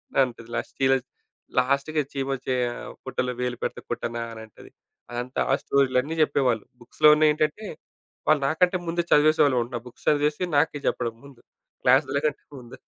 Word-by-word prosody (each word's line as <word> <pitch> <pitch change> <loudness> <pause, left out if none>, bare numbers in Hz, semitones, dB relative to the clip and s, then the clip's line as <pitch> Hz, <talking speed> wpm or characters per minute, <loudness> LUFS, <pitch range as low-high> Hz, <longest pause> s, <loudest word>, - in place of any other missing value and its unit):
అనంటది. 120 -4 0
Last 115 - -4
చిలస్ 135 -1 +3 0.5
లాస్ట్‌కి 140 +4 0
అది 140 - -9
చీమ 135 0 -2 0.2
చేయ 125 -1 +1 0.4
"పుట్టలో 125 -1 -2
వేలు 125 -1 -2
పెడితే - - -3
కుట్టనా!" 120 0 -3
అనంటది. 110 -2 -12 0.4
అదంతా 125 +2 -3
ఆ - - +5
స్టోరీలన్నీ 140 +2 +1
జెప్పేవాళ్ళు. 125 -7 +2 0.2
బుక్స్‌లో 125 +5 +2
ఉన్నాయి 150 0 +4
ఏంటంటే, 155 +7 -1 0.6
వాళ్ళు 155 -2 +4
నాకంటే 180 +5 +2
ముందు 175 +1 0
చదివేసేవాళ్ళున్నారు 130 -6 +3
బుక్స్ 120 - -15
చదివేసి 150 +3 +2
నాకే 145 0 +2
జెప్పడం 115 -1 -1
ముందు 140 -3 -15 0.4
క్లాస్‍ల 135 +2 +3
కంటే 150 -2 -1 0.2
ముందు. 120 -1 -12
135 Hz, 145 wpm, -25 LUFS, 125-150 Hz, 0.6 s, ఆ